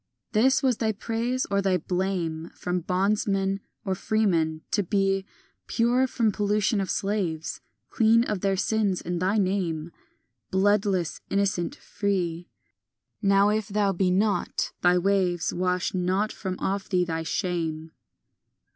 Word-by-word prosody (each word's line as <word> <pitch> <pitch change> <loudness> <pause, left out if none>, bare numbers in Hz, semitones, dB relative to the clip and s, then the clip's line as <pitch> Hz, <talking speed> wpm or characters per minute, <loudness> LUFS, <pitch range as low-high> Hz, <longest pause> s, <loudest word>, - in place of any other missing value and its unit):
IX - - -41
This 265 +3 +4
was 255 -4 +2
thy 220 -1 0
praise 235 +4 -2
or 200 0 +2
thy 190 -2 +2
blame 175 -2 -2
From 180 0 -2
bondsman 195 +2 0 0.3
or 190 - 0
freeman—to 185 -4 0
be 195 0 0 0.4
Pure 245 +3 +2
from 230 -4 +1
pollution 210 +1 +1
of 190 - -3
slaves, 185 -6 -2 0.3
Clean 230 0 +4
of 210 -6 -2
their 195 -1 +1
sins, 205 -2 +1
and 175 0 -3
thy 195 +4 +2
name 180 -5 -1 0.6
Bloodless, 195 -3 +1
innocent, 195 -3 0
free; 180 -4 -2 0.7
Now 200 0 +4
if 215 -1 0
thou 205 -2 +1
be 185 +1 +1
not, 195 0 0
thy 180 0 +4
waves 180 -2 +1
Wash 180 +1 0
not 185 +3 0
from 185 -2 -5
off 195 0 -2
thee 180 -2 +2
thy 165 -1 -2
shame. 160 -2 -2
195 Hz, 135 wpm, -26 LUFS, 180-210 Hz, 0.7 s, This